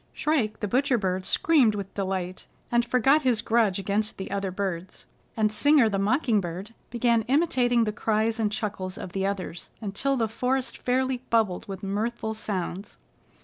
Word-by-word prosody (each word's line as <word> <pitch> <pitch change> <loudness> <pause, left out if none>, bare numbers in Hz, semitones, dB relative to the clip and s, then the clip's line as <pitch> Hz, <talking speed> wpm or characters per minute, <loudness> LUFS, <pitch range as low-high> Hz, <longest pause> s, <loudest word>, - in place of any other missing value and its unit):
Shrike 250 -9 0
the 210 - 0
Butcher 260 +3 +2
Bird 185 -3 -1
screamed 270 -10 +3
with 195 -1 -6
delight, 185 -2 -3 0.2
and 240 0 +3
forgot 265 +5 +3
his 245 -5 +1
grudge 225 -5 +2
against 205 +2 -1
the 190 - -6
other 200 -1 -1
birds, 185 -2 -4 0.3
and 215 -1 +2
Singer 265 +2 +4
the 200 -2 -1
Mocking 220 +1 +2
Bird 185 +5 -6 0.2
began 235 -1 +2
imitating 250 -5 +3
the 215 - 0
cries 220 +1 0
and 215 -2 +1
chuckles 200 -3 -4
of 180 - -7
the 195 +1 -1
others 190 -3 -5
until 235 +6 -1
the 225 -2 +1
forest 255 +4 -1
fairly 255 0 0
bubbled 220 -6 +1
with 195 -1 -7
mirthful 220 +3 -2
sounds. 195 -2 -4
215 Hz, 165 wpm, -26 LUFS, 195-245 Hz, 0.3 s, Singer